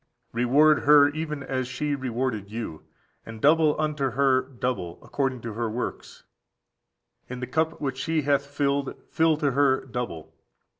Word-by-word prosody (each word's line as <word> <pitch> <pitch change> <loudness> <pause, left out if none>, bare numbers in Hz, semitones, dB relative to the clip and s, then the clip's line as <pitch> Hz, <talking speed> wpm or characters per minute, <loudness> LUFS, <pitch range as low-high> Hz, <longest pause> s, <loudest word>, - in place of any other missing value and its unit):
41. 120 +1 -1
"Reward 150 +3 +5
her 145 0 +7
even 150 -1 -4
as 130 -1 -2
she 145 +3 -2
rewarded 125 -6 -3
(you), 110 -8 -6 0.4
and 115 0 -10
double 155 +3 +4
unto 150 -3 0
her 130 +1 +3
double, 125 -9 -4
according 135 -3 -2
to 115 -1 -6
her 115 +1 -2
works: 120 +3 -6 1.1
in 125 0 -6
the 125 - -3
cup 160 +5 -1
which 135 -2 -3
she 160 0 0
hath 140 0 +1
filled, 140 -1 -1 0.2
fill 160 -1 +3
to 145 -3 +1
her 135 0 +2
double. 120 -11 -6
135 Hz, 155 wpm, -25 LUFS, 125-145 Hz, 1.1 s, her